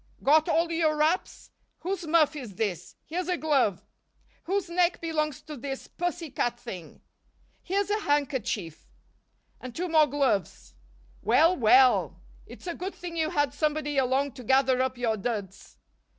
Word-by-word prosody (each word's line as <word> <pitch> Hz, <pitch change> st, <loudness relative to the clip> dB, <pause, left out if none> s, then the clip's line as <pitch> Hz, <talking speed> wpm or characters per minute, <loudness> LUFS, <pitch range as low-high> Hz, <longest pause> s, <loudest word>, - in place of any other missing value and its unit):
Got 310 Hz, +2 st, +4 dB
all 335 Hz, +1 st, +2 dB
your 320 Hz, -2 st, +1 dB
wraps? 315 Hz, +5 st, -1 dB, 0.3 s
Whose 365 Hz, -1 st, -3 dB
muff 310 Hz, -1 st, +3 dB
is 245 Hz, -10 st, -8 dB
this? 180 Hz, -4 st, -3 dB
Here's 350 Hz, +2 st, -3 dB
a 360 Hz, -1 st, 0 dB
glove. 270 Hz, -, +1 dB, 0.6 s
Whose 385 Hz, +1 st, -1 dB
neck 345 Hz, +1 st, +1 dB
belongs 305 Hz, -3 st, -2 dB
to 305 Hz, -, -8 dB
this 270 Hz, +1 st, -6 dB
pussy 350 Hz, -3 st, -4 dB
cat 240 Hz, -2 st, -1 dB
thing? 185 Hz, -10 st, -9 dB, 0.6 s
Here's 395 Hz, +2 st, -1 dB
a 420 Hz, -, +1 dB
handkerchief 260 Hz, -, -2 dB, 0.7 s
and 250 Hz, -2 st, -9 dB
two 360 Hz, +2 st, -2 dB
more 310 Hz, -2 st, +5 dB
gloves 270 Hz, -9 st, -1 dB, 0.5 s
Well, 315 Hz, +10 st, +4 dB
well! 255 Hz, +1 st, +4 dB, 0.3 s
It's -, -, -12 dB
a 345 Hz, -, -3 dB
good 370 Hz, +4 st, -6 dB
thing 350 Hz, -1 st, -7 dB
you 320 Hz, -1 st, 0 dB
had 290 Hz, -5 st, 0 dB
somebody 295 Hz, -1 st, 0 dB
along 265 Hz, +2 st, +1 dB
to 255 Hz, 0 st, -11 dB
gather 260 Hz, +1 st, +3 dB
up 260 Hz, -1 st, -1 dB
your 230 Hz, -3 st, 0 dB
duds. 200 Hz, -3 st, -5 dB
290 Hz, 150 wpm, -27 LUFS, 250-335 Hz, 0.7 s, more